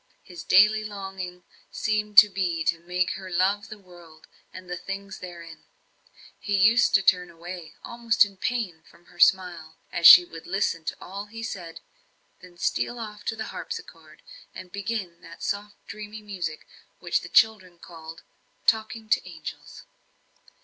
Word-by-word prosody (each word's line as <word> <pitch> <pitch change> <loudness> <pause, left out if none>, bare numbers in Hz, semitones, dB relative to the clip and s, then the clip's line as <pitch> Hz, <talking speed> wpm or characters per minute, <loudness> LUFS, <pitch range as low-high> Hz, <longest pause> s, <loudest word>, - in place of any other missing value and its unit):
His 175 -3 -10
daily 210 +4 +5
longing 190 -3 -7 0.3
seemed 210 -1 -2
to 210 - +12
be 180 -4 -2
to 165 +1 0
make 180 +2 -1
her 190 -1 -7
love 195 +4 +1
the 215 - -9
world, 175 -5 -17 0.3
and 185 0 -11
the 180 - -4
things 195 +1 -7
therein. 170 -3 -10 0.8
He 205 - -2
used 220 +5 +5
to 195 - +4
turn 180 -1 +3
away, 170 0 -10
almost 235 -2 +2
in 200 -1 -12
pain, 195 -7 -3
from 175 - -22
her 175 - -20
smile, 175 -5 +2 0.2
as 170 -1 +6
she 180 0 +11
would 165 -1 -12
listen 175 -3 -1
to - - -4
all 200 +3 -8
he 225 +2 -9
said, 175 -7 -7 0.6
then 180 -1 -16
steal 240 +7 -1
off 210 -2 -8
to 225 - -2
the 220 - -6
harpsichord, 465 -1 -9 0.3
and 185 -1 -10
begin 200 -3 -5
that 170 0 -12
soft, 205 0 -3
dreamy 210 +1 -9
music, 180 -7 -5 0.3
which - - -1
the - - -10
children 190 -6 +3
called 165 -2 -12 0.4
"talking 220 0 0
to 195 - 0
angels." 160 -3 -10
190 Hz, 155 wpm, -25 LUFS, 175-210 Hz, 0.8 s, to